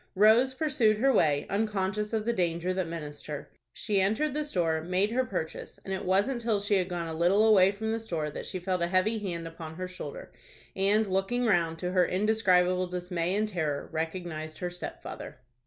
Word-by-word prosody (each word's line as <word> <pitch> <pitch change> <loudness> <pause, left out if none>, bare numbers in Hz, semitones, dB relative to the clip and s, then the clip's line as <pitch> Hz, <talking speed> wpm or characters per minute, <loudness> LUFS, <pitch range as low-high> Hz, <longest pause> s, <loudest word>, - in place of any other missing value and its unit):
Rose 225 +6 +5
pursued 260 -8 +2
her 270 +4 +3
way, 150 -8 +3
unconscious 210 0 -1
of 220 -2 -1
the 235 - +1
danger 175 -1 0
that 185 -2 -1
menaced 150 -3 -7
her. 150 -2 -6 0.2
She 200 - 0
entered 220 +10 +1
the 300 +1 -1
store, 170 - 0
made 185 +5 0
her 255 +2 +2
purchase, 180 -9 -5
and 195 - -3
it 190 - -3
wasn't 200 +7 +1
till 225 -3 +1
she 205 +1 0
had 185 -1 -1
gone 175 -2 -3
a 160 - -4
little 180 +6 +3
away 195 -3 +6
from 220 +2 -3
the 225 - -1
store 165 -9 -3
that - - -6
she 185 - -3
felt 180 0 -2
a 170 - +2
heavy 190 +5 +1
hand 170 -5 -4
upon 165 -1 -8
her 185 +2 -4
shoulder, 450 - -8 0.4
and, 205 +3 +3
looking 195 +6 0
round, 170 -6 +2
to 180 +1 -3
her 180 -2 +3
indescribable 185 -3 +2
dismay 180 0 -2
and 215 +1 0
terror, 155 -7 -2
recognized 160 -1 -4
her 180 -1 -3
stepfather. 180 - -7
185 Hz, 200 wpm, -29 LUFS, 170-215 Hz, 0.4 s, away